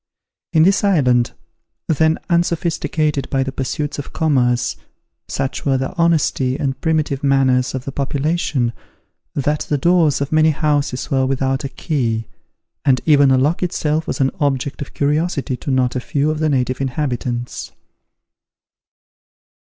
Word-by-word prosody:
In 155 - +4
this 195 +4 +3
island, 130 -11 +3 0.5
then 160 0 +2
unsophisticated 165 -4 0
by 135 -1 +1
the 135 - -4
pursuits 145 +2 -3
of 145 - -7
commerce, 125 -6 +1 0.5
such 130 - -3
were 135 -2 +2
the 130 +5 -3
honesty 155 -6 +1
and 135 -1 -2
primitive 155 -4 0
manners 130 -2 +2
of 130 - -5
the 135 - -4
population, 140 -3 -1 0.6
that 150 +2 0
the 145 - +2
doors 165 0 +3
of 140 0 -3
many 155 0 +4
houses 145 -4 -1
were 130 -1 +2
without 135 +1 0
a - - -3
key, 120 -8 -2 0.6
and 135 -3 +3
even 145 -3 +5
a 130 - +4
lock 145 +6 +1
itself 160 -3 -1
was - - -3
an 135 -1 +2
object 140 -2 -1
of 140 - -7
curiosity 150 -1 0
to 140 - -6
not 130 -2 +1
a - - 0
few 145 +4 0
of 155 - -3
the 155 0 +1
native 130 -1 0
inhabitants. 125 -3 -3
140 Hz, 145 wpm, -19 LUFS, 130-155 Hz, 0.6 s, even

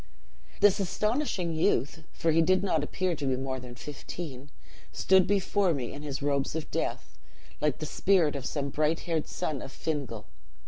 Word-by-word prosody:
"This 205 -1 +6
astonishing 200 - 0
youth 155 0 +1
(for 165 - +1
he 165 +1 +5
did 185 +3 +3
not 160 -6 +1
appear 185 +3 -1
to 145 -2 -3
be 130 -1 +1
more 130 0 -3
than 125 -1 -9
fifteen) 145 0 -7 0.4
stood 190 -1 +4
before 200 -3 +2
me 125 -4 -4
in 145 - -7
his 140 -2 -4
robes 140 0 0
of 160 -2 -4
death, - - -3 0.4
like 150 -3 +2
the 155 - -4
spirit 170 -2 +3
of 135 -2 -3
some 140 -2 -2
bright 155 +3 +1
haired 165 -3 -1
son 145 -4 -3
of 135 - -7
Fingal. 135 -9 -3
155 Hz, 175 wpm, -29 LUFS, 140-175 Hz, 0.4 s, This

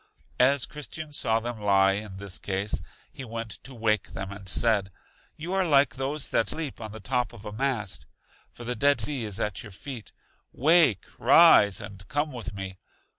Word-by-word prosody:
As 135 +1 +4
Christian 150 +1 -7
saw 115 -5 +1
them 115 -1 -6
lie 100 -1 +4
in 100 -1 -4
this 95 -4 -4
case, 95 +5 -2 0.3
he 135 - -9
went 115 -2 -6
to 130 - -9
wake 110 -2 0
them, 95 +1 -5
and 100 -1 -8
said: 105 -2 +2 0.5
You 170 +4 -5
are 190 0 +2
like 140 -7 +4
those 135 +2 -2
that 110 - +1
sleep 155 -7 -2
on 110 -1 -6
the 110 - -9
top 125 +2 -1
of 110 -2 -13
a 105 - -5
mast, 110 -4 -2 0.4
for 120 - -11
the 120 +1 -2
Dead 140 +3 +3
Sea 125 +1 0
is 105 0 -3
at 105 -4 -2
your 105 - -10
feet. 120 +4 -8 0.4
Wake, 150 - +4
rise, 100 -2 +6
and 95 -1 -9
come 145 +1 -1
with 115 -4 -6
me. 95 -2 -7
115 Hz, 185 wpm, -27 LUFS, 100-135 Hz, 0.5 s, rise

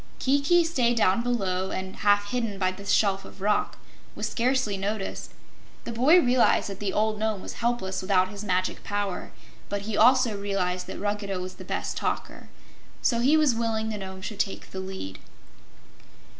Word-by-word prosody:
Kiki 285 +6 +3
stayed 245 -8 +1
down 205 0 +3
below 190 -6 -1
and, 190 0 -5
half 205 0 +2
hidden 230 -5 -1
by 185 -1 +1
the 200 +2 -10
shelf 195 -2 +2
of - - -13
rock, 205 +2 0 0.4
was - - -2
scarcely 250 -3 +1
noticed. 195 +1 -4 0.5
The - - -5
boy 265 +10 +6
realized 250 -7 +3
that 195 0 -7
the 205 -2 -1
old 215 +1 0
Nome 220 -2 0
was - - -6
helpless 235 -6 -1
without 185 -1 +2
his 205 0 -7
magic 185 -2 -1
power, 205 -2 -3 0.4
but 205 0 -2
he 215 0 -3
also 245 0 +5
realized 185 -3 -2
that - - -6
Ruggedo 205 -2 -2
was 185 0 -5
the - - -9
best - - -3
talker. - - -3 0.5
So 235 - +2
he 275 +6 +4
was 300 -5 +4
willing 225 -1 -1
the 215 - -3
Nome 190 -1 -7
should 210 0 -6
take 200 -2 -2
the 190 - -5
lead. 190 - -6
205 Hz, 175 wpm, -26 LUFS, 190-235 Hz, 0.5 s, boy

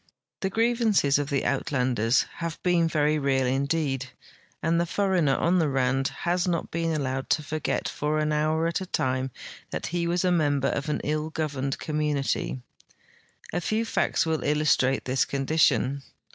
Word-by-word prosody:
The 190 - -1
grievances 225 - +2
of 145 -1 -2
the 140 -3 0
Uitlanders 125 -4 +1
have 165 -2 -4
been 175 -2 +3
very 155 -1 +1
real 135 -2 +1
indeed, 135 0 -1 0.5
and 165 +2 +2
the 170 - -1
foreigner 180 -7 +2
on 180 +2 +2
the 160 -3 +2
Rand 135 0 +1
has 175 +1 0
not 170 -2 -1
been 165 0 -1
alloAved 135 -2 -3
to 155 - -2
forget 155 +1 -2
for 150 +1 -1
an 155 0 0
hour 155 +2 +1
at 170 +2 -1
a 190 - -5
time 130 -4 -1 0.4
that - - -4
he 170 -1 0
Avas 175 +2 0
a 180 - +3
member 145 -5 +2
of 140 +3 -2
an 150 - -1
ill 155 +1 -1
governed 140 -4 -2
com 155 -1 -3
munity. 135 - -1 0.9
A - - 0
feAV 215 +6 0
facts - - +1
Avill 160 -1 -1
illustrate 145 -3 +2
this 130 0 +2
condition. 140 -1 +1
150 Hz, 170 wpm, -26 LUFS, 135-170 Hz, 0.9 s, been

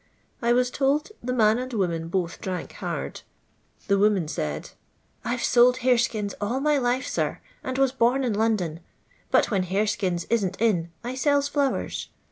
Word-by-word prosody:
I 235 0 +2
was 250 +1 +3
told 285 +6 +1
the 250 - -3
man 220 -2 +3
and 255 +1 -5
woman 170 -6 -1
both 175 0 -2
drank 185 -4 -4
hard. - - -5 0.6
The 200 -1 +2
woman 200 -5 +3
said: 75 - -4 0.2
— - - -41
" - - -40
I 240 - -1
\e - - -5
sold 250 +1 +4
horeskins 235 -5 +2
all 230 +6 0
my 295 0 +2
life, 250 +1 0
sir, - - -1 0.2
and 260 0 -3
was 270 -1 +3
bom 260 +1 +2
in 240 -4 0
London; 205 -7 0 0.5
but - - +3
when 195 -3 +2
hareskins 185 -2 0
isn't 195 -5 0
in, 190 -7 +2
I 245 +2 -3
sells 285 +1 +2
flowers. 285 -2 -1
230 Hz, 175 wpm, -25 LUFS, 195-255 Hz, 0.6 s, sold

